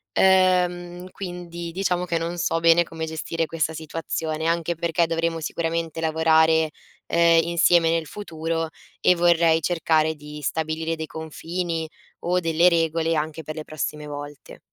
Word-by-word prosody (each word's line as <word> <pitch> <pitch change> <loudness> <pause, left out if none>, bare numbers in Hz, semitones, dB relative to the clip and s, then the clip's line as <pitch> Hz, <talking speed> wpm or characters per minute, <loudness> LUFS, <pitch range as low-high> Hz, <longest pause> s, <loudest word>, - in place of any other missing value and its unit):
Ehm, 180 -1 +2
quindi 175 -3 -7
diciamo 180 -1 -1
che 170 -1 -1
non 170 +1 -3
so 165 -1 0
bene 165 +1 +5
come 160 -1 -6
gestire 160 +1 -3
questa 160 -1 -1
situazione, 160 0 -4
anche 170 0 0
perché 170 0 +1
dovremo 165 0 -1
sicuramente 165 0 -3
lavorare, 160 0 +3 0.4
ehm, 170 -1 +5
insieme 170 0 +3
nel 165 -1 0
futuro, 165 -4 -3 0.3
e 180 - +5
vorrei 170 -1 +4
cercare 160 -1 +1
di 150 0 -10
stabilire 160 +2 -2
dei 160 -1 -5
confini, 165 +1 -4 0.4
o 180 +1 +2
delle 165 +1 +4
regole 165 -1 +1
anche 155 +1 -2
per 155 +2 -6
le 155 - -5
prossime 150 0 -4
volte. 145 -1 -9
165 Hz, 145 wpm, -24 LUFS, 160-170 Hz, 0.4 s, bene